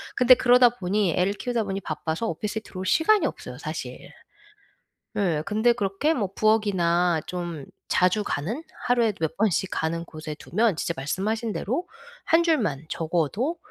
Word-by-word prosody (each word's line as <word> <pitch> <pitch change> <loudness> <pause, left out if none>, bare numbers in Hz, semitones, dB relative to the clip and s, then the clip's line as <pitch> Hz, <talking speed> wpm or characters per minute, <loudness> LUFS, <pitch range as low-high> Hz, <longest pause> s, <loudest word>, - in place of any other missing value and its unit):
근데 250 0 +7
그러다 245 0 +6
보니 190 -2 0
애를 185 +2 +2
키우다 240 +1 -2
보니 195 -1 -4
바빠서 160 +4 -3
오피스에 210 +5 -3
들어올 185 -2 -7
시간이 350 - +3
없어요 - - -5
사실. - - -7 1.1
예. 170 -7 +1
근데 220 +3 +3
그렇게 210 +8 0
뭐 210 - -1
부엌이나 180 -6 +2
좀 170 -5 -5 0.2
자주 185 +3 +2
가는, 205 - -3 0.2
하루에도 235 -4 +2
몇 160 -1 -2
번씩 195 -2 +1
가는 165 +1 -2
곳에 155 -2 -7
두면 210 +3 0
진짜 170 - -1
말씀하신 210 - -2
대로 270 - -2 0.4
1 330 +1 +3
줄만 215 - 0
적어도 175 - -1
200 Hz, 325 characters per minute, -25 LUFS, 170-235 Hz, 1.1 s, 근데